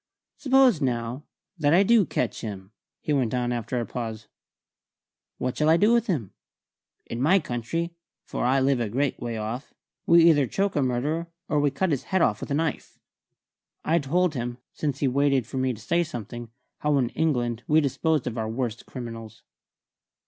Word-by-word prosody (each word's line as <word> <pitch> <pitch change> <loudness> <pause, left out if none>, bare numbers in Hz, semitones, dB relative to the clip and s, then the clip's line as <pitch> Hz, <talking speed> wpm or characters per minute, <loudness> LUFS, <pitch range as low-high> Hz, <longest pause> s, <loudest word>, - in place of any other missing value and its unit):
"Suppose, 265 - +4
now, 125 +2 -2 0.3
that 150 +1 +4
I 190 - +6
do 215 -3 +4
catch 120 -5 -2
him," 100 -3 -7 0.3
he 150 - -1
went 125 -4 +1
on 125 -1 0
after 120 +1 -2
a 120 - -2
pause. 110 -3 -5 1.1
"What 125 0 -2
shall 155 0 +2
I 165 - +6
do 210 +6 +4
with 235 0 +2
him? 135 - -2 0.7
In 115 - -5
my 165 +8 +5
country 165 +3 -3 0.3
for - - -3
I 130 +2 +3
live 135 -1 +2
a 115 -3 -1
great 135 +4 -1
way 120 -2 -4
off 110 +5 -5 0.3
we 170 0 +7
either 145 -5 +5
choke 195 +6 -1
a 145 - +2
murderer 140 +7 -1 0.2
or 145 -1 +2
cut 180 +7 -1
off - - 0
his 140 - -1
head 190 -2 +1 0.2
with - - -7
a 140 - 0
knife." 160 -1 -2 0.9
I 165 +2 +3
told 170 +4 +1
him 120 -2 -4 0.2
since 145 -3 -3
he 140 - +3
waited 135 -1 +2
for 130 - -7
me 130 0 +1
to 110 - -7
say 170 +10 +1
something 120 -6 -7 0.3
how 150 -1 +2
in 125 -3 +1
England 120 -7 0
we 155 +1 +5
disposed 155 0 0
of 120 -2 -3
our 110 0 -2
worst 115 -1 -3
criminals. 115 -4 -8
135 Hz, 185 wpm, -26 LUFS, 120-160 Hz, 1.1 s, we